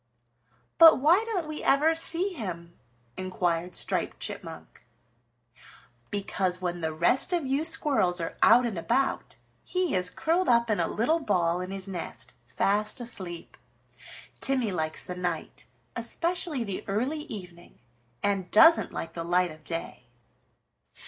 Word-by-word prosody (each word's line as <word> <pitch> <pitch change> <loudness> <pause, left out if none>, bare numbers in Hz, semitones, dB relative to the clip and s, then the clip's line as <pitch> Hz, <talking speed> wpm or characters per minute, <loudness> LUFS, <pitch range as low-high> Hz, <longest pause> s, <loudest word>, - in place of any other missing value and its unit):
"But 330 -1 +9
why 335 +10 +4
don't 380 -8 -2
we 310 0 -6
ever 300 +4 +3
see 335 +3 -1
him?" 175 - -7 0.4
inquired 180 -2 -2
Striped - - -2
Chipmunk. - - -7 1.3
"Because, 190 -2 -2
when 175 -1 -3
the 160 -1 -1
rest 175 - +3
of 340 -5 0
you 270 +3 0
squirrels 190 - +1
are 165 - -4
out 240 +2 +6
and 210 -7 -3
about, 255 +10 -1 0.3
he 365 -3 -1
is 180 -1 +4
curled 340 - 0
up 235 -1 +3
in 210 - 0
a - - +1
little 310 +10 +1
ball 180 - 0
in 185 - -5
his 195 0 -3
nest, 180 -3 -6
fast 210 +3 0
asleep. 190 -8 -6 0.8
Timmy 255 -6 +1
likes 160 -3 -3
the 180 - -5
night, 180 0 -4 0.3
especially 340 -6 -2
the 200 -4 -5
early 260 +10 -2
evening, 180 - -10 0.5
and 195 -3 0
doesn't 325 +10 +6
like 165 - -6
the 165 - -5
light 175 +1 +1
of 155 0 -14
day." 165 -7 -6
205 Hz, 140 wpm, -27 LUFS, 180-300 Hz, 1.3 s, But